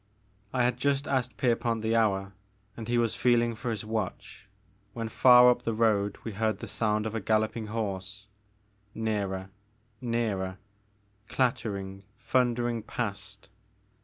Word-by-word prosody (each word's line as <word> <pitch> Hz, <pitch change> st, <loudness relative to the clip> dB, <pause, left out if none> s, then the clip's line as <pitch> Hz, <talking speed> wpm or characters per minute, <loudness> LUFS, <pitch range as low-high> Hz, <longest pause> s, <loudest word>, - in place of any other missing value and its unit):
I 125 Hz, -1 st, +1 dB
had 125 Hz, 0 st, +1 dB
just 140 Hz, +2 st, 0 dB
asked 130 Hz, -3 st, -1 dB
Pierpont 115 Hz, -2 st, 0 dB
the 110 Hz, +1 st, +1 dB
hour, 100 Hz, -3 st, +1 dB, 0.4 s
and 115 Hz, -2 st, -7 dB
he 120 Hz, 0 st, +1 dB
was 115 Hz, -2 st, +2 dB
feeling 120 Hz, -1 st, +2 dB
for 120 Hz, +2 st, -5 dB
his 110 Hz, -1 st, -3 dB
watch 110 Hz, -2 st, -5 dB, 0.4 s
when 115 Hz, -1 st, -4 dB
far 125 Hz, +1 st, +7 dB
up 120 Hz, -, -1 dB
the 115 Hz, -2 st, -2 dB
road 105 Hz, -3 st, +2 dB
we 115 Hz, -, -4 dB
heard 110 Hz, +2 st, 0 dB
the -, -, -7 dB
sound 105 Hz, -1 st, 0 dB
of 110 Hz, -, -3 dB
a 115 Hz, -, -1 dB
galloping 110 Hz, +2 st, 0 dB
horse, 100 Hz, -2 st, -4 dB, 0.7 s
nearer, 100 Hz, -4 st, -2 dB, 0.5 s
nearer, 110 Hz, -6 st, -1 dB, 0.7 s
clattering, 100 Hz, -6 st, -1 dB, 0.2 s
thundering 120 Hz, -2 st, 0 dB
past. 100 Hz, -2 st, -5 dB
110 Hz, 135 wpm, -28 LUFS, 105-120 Hz, 0.7 s, far